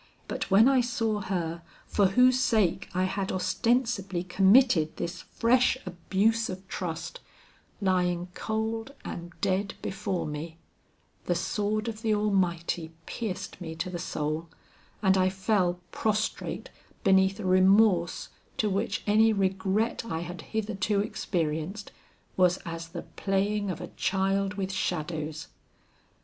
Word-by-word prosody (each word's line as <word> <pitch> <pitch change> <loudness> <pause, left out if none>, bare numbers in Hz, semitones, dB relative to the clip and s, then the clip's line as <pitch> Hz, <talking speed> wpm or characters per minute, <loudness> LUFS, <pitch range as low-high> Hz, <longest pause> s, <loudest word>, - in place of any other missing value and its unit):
But - - -3
when 205 +5 +7
I 270 -2 +5
saw 230 -3 -1
her 170 -4 -2 0.2
for 200 -2 +3
whose 250 +6 +5
sake 220 -9 +2
I 185 +1 0
had 190 +1 -1
ostensibly 200 -2 0
committed 190 - +4
this 170 +1 -4
fresh 250 +2 +2
abuse 195 +5 +1
of 185 +1 -7
trust, 165 -4 -5 0.6
lying 180 -3 +1
cold 225 +6 -3
and 170 0 -6
dead 195 0 0
before 195 -1 -2
me, 155 +2 -6 0.7
the - - +1
sword 215 +1 -1
of 220 -1 -5
the 220 -2 +2
Almighty 175 -5 0
pierced 195 -4 -5
me 160 -2 -5
to 170 +3 -3
the 175 - -4
soul, 155 0 -3 0.5
and 190 -1 +4
I 185 0 +4
fell 190 -2 +1
prostrate 215 0 -2 0.3
beneath 190 0 +4
a 210 - -4
remorse 185 -1 +4 0.3
to 210 -2 +1
which 200 +4 -1
any 220 +2 +5
regret 195 +3 0
I 165 -8 -3
had 175 0 -6
hitherto 210 0 -1
experienced, 175 -1 -2 0.4
was 180 -1 +4
as 165 -1 -5
the 170 0 -7
playing 200 +1 -1
of 180 - -3
a 175 - -7
child 195 +1 +1
with 195 -1 -2
shadows. 160 -4 -3
190 Hz, 130 wpm, -28 LUFS, 175-215 Hz, 0.7 s, when